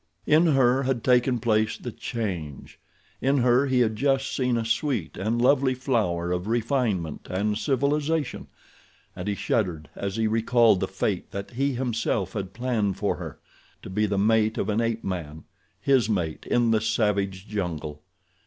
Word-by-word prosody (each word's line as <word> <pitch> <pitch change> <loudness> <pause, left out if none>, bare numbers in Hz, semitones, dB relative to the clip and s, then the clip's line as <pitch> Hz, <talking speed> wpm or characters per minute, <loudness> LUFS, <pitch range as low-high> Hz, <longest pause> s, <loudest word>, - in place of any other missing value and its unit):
In 160 +3 +4
her 130 0 +4
had 130 -3 -1
taken 125 0 +3
place 110 -1 +1
the 120 - -6
change. 90 - -5 0.4
In 135 +2 +2
her 125 +2 +3
he 130 -2 +2
had 110 -2 +1
just 135 +3 0
seen 125 -2 +1
a 115 - -2
sweet 115 - -1
and 110 +5 -1
lovely 130 +1 +3
flower 105 -10 0
of 90 +2 -2
refinement 115 - -1
and 105 +3 0
civilization, 145 +4 0 0.7
and 90 - -6
he 100 - 0
shuddered 90 -9 -1
as 100 0 -4
he 115 0 0
recalled 115 -1 +3
the - - -1
fate - - -2
that 100 0 -6
he 135 +3 0
himself 115 -6 -1
had 95 -3 -4
planned 110 -4 -1
for - - -1
her—to - - -12
be 105 +3 +1
the 100 -1 -1
mate 110 +2 +2
of 100 - -1
an 105 +2 +1
ape 115 -1 -1
man, 80 -5 -5 0.4
his 135 -5 +2
mate, 85 -7 -2
in 120 -1 +2
the 110 -1 +2
savage 100 -3 0
jungle. 80 -7 -4
110 Hz, 160 wpm, -25 LUFS, 100-125 Hz, 0.7 s, In